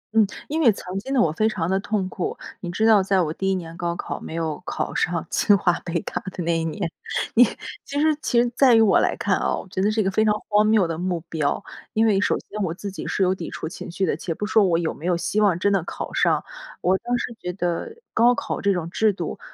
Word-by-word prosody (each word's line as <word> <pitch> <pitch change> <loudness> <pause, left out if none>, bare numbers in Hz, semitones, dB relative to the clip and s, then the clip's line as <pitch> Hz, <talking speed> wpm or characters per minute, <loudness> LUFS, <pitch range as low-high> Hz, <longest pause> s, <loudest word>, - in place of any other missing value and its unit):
嗯， 220 - +7 0.2
因 320 +2 -1
为 240 - +6
曾 190 -1 -5
经 265 +6 -7
的 270 - +2
我 165 -9 +3
非 215 +7 +1
常 175 -6 -2
地 190 +1 +1
痛 205 -1 -1
苦。 185 - -4 0.2
你 175 - -6
知 200 +6 0
道 220 -3 +6
在 190 0 +2
我 155 -3 -1
第 195 +3 -2
1 190 - +1
年 165 -2 -6
高 170 -1 -2
考 - - -5
没 160 - -7
有 165 0 -2
考 - - -3
上 175 -2 0
清 205 - +4
华 175 -2 +2
北 170 -1 -2
大 - - -4
的 180 - -5
那 170 0 +1
一 - - -2
年， 165 +1 -3 0.4
你 245 - +7 0.4
其 285 +1 -3
实 310 0 +3
其 240 - +2
实 240 - +3
在 260 -3 +6
于 225 - +6
我 210 -3 +5
来 - - +1
看 - - +1
哦， - - -1
我 - - -17
觉 185 - -2
得 205 - +3
是 215 +1 0
一 - - +1
个 195 - 0
非 215 - +2
常 215 - +3 0.2
荒 210 +1 +4
谬 215 -5 +4
的 165 0 -4
目 180 -2 -1
标。 155 +3 -1 0.3
因 220 +1 +3
为 205 -3 +3
首 - - +2
先 210 0 -7
我 170 -3 -1
自 200 +2 -6
己 190 - -7
是 195 - 0
有 185 - +3
抵 175 -3 -6
触 - - -5
情 - - -8
绪 190 +2 0
的， - - 0
且 165 - -4
不 210 - -3
说 215 0 +4
我 170 -3 +2
有 165 -1 -1
没 165 - -7
有 175 -2 +2
希 210 +4 0
望 195 -5 +3
真 200 +3 +2
的 195 - +2
考 - - -6
上。 - - +2 0.4
我 185 +1 +3
当 245 0 -1
时 240 - -4
觉 180 - -3
得 175 - -3 0.2
高 240 +2 +5
考 - - -3
这 200 - +2
种 175 -4 -1
制 215 +2 +2
度， - - -5
190 Hz, 290 characters per minute, -23 LUFS, 175-215 Hz, 0.4 s, 嗯